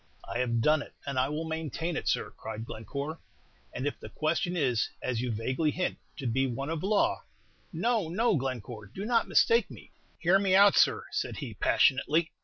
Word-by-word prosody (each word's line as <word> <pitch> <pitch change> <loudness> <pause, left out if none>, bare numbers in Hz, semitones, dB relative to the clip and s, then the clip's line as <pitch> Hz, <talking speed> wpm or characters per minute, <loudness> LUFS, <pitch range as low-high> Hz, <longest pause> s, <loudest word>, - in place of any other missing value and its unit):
"I 120 - -3
have 120 -2 +1
done 155 +5 +4
it, - - -11
and 140 -2 -1
I 130 +2 +2
will 150 +2 -2
maintain 160 +1 -3
it, - - -3
sir," - - 0
cried 110 0 -7
Glencore; 140 +9 -5 0.5
"and 125 - -4
if 145 - -2
the - - -9
question 170 +3 -1
is, 125 -7 +1
as 120 -2 -2
you 125 -1 -1
vaguely 130 +8 0
hint, 180 +4 -2 0.2
to 140 - -6
be 135 +3 +1
one 135 +5 -3
of 165 -2 -2
law 205 +2 +1 0.3
" - - -35
"No, 230 -8 0
no, 210 +5 +2
Glencore; 125 -6 -4
do 190 - -7
not 230 0 +2
mistake 460 0 +4
me." - - -13 0.3
"Hear 180 +3 +4
me 195 -1 +3
out, 200 0 +7
sir," - - +4
said - - -2
he, - - -5
passionately. 155 +5 +2
150 Hz, 200 wpm, -29 LUFS, 125-175 Hz, 0.5 s, out